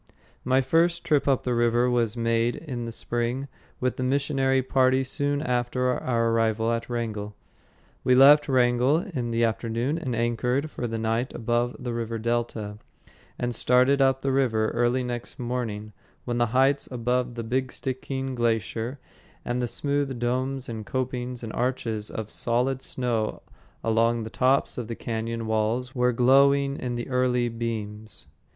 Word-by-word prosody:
My 130 +1 +3
first 165 +6 +2
trip 150 -4 +2
up 135 -2 +2
the 125 - 0
river 120 +1 +3
was 120 -2 +1
made 115 +1 +1
in 125 -7 -5
the 115 - -5
spring 120 +4 -2 0.3
with 130 -1 -1
the 130 - -2
missionary 135 0 +1
party 130 0 +3
soon 145 +2 -1
after 125 0 0
our 115 -2 0
arrival 115 0 +1
at 115 +1 -2
Wrangell. 110 -3 -3 0.7
We 125 - +4
left 145 +3 +7
Wrangell 125 +2 +3
in 145 - -4
the 115 0 +1
afternoon 115 +6 -1
and 130 -7 -3
anchored 125 +5 0
for 120 - -3
the 115 0 -3
night 115 +3 -1
above 120 +1 0
the 125 -2 -4
river 115 -1 -3
delta, 115 -2 -2 0.6
and 120 0 -2
started 125 +4 +3
up 135 -1 +3
the 135 - +1
river 115 -5 +2
early 120 +2 +1
next 120 -1 -5
morning 115 -4 -4 0.3
when 120 -1 -1
the 120 - +3
heights 135 +4 +2
above 125 0 -1
the 115 - -4
"Big 130 +3 -1
Stickeen" 130 0 -4
Glacier 115 +1 -1 0.5
and 125 +1 -1
the 120 - 0
smooth 140 0 -1
domes 130 +2 -1
and 110 -2 -5
copings 125 0 -3
and 110 - -5
arches 115 -4 -2
of 110 -1 -6
solid 125 +3 0
snow 120 -5 -2 0.4
along 115 +1 +2
the 110 - -7
tops 130 +1 +2
of 120 - -5
the 115 - -4
cañon 115 0 -3
walls 110 +3 -1
were 125 -1 +2
glowing 140 +3 +4
in 125 -1 -3
the 120 - -4
early 125 -2 +1
beams. 110 -2 -5
120 Hz, 160 wpm, -26 LUFS, 115-130 Hz, 0.7 s, left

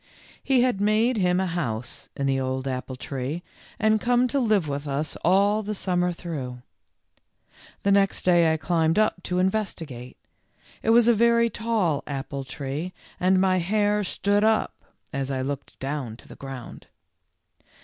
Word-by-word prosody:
He 260 -3 +3
had 245 -6 +1
made 220 +4 +2
him 180 -2 +2
a 190 - +1
house 130 -9 -3
in 140 - -1
the 135 -1 +1
old 130 0 -2
apple 130 0 -4
tree 135 +6 -4 0.3
and 215 -1 +2
come 245 +1 +3
to 280 - +1
live 215 - +2
with 145 +1 -4
us 145 +2 -2
all 200 +4 +4
the 210 0 -4
summer 180 -2 0
through. 135 -8 -6 1.2
The 200 - +3
next 195 0 +3
day 170 -3 +4
I 160 - +1
climbed 160 +2 +1
up 215 -4 +2
to 180 0 -2
investigate. 175 - -2 0.6
It - - -1
was 235 0 +6
a 240 - +6
very 235 +1 +3
tall 210 -10 0
apple 140 0 -4
tree 140 +6 -5 0.3
and 185 +1 +3
my 185 -1 +3
hair 205 +3 +1
stood 200 +2 +1
up 220 0 +2 0.4
as 135 0 -2
I 130 -1 -1
looked 140 +1 -5
down 135 -5 -4
to - - -16
the - - -11
ground. 135 -3 -9
180 Hz, 160 wpm, -25 LUFS, 140-210 Hz, 1.2 s, was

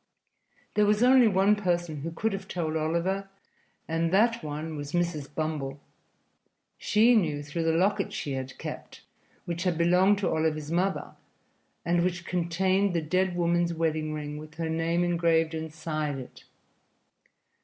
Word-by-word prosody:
There 210 -1 +3
was 210 +2 +3
only 250 -1 +6
one 195 +1 +4
person 175 -5 -1
who 165 - -3
could 215 +6 -1
have 195 - -5
told 160 -3 -2
Oliver, 170 +5 -1 0.6
and 165 +1 0
that 230 +4 +3
one 155 +1 -5
was 145 0 -6
Mrs. 170 -5 -1
Bumble. 150 -3 -3 1.0
She 225 +4 +4
knew 155 -8 +1
through 165 +3 -3
the 165 - +2
locket 190 +5 +1
she 145 - -4
had 130 -1 -5
kept, - - -8 0.4
which 170 0 -4
had 180 -3 0
belonged 180 +4 +4
to 195 - 0
Oliver's 155 -1 -1
mother 185 +3 -1 0.7
and 170 0 +2
which 180 -1 -2
contained 185 +2 +1
the 165 - +1
dead 185 +3 0
woman's 170 0 +1
wedding 155 -1 -1
ring 150 -1 -5
with 155 0 -11
her 165 -1 -3
name 165 +2 +1
engraved 165 -2 +2
inside 155 -2 -3
it. 130 -2 -11
170 Hz, 150 wpm, -28 LUFS, 155-185 Hz, 1.0 s, only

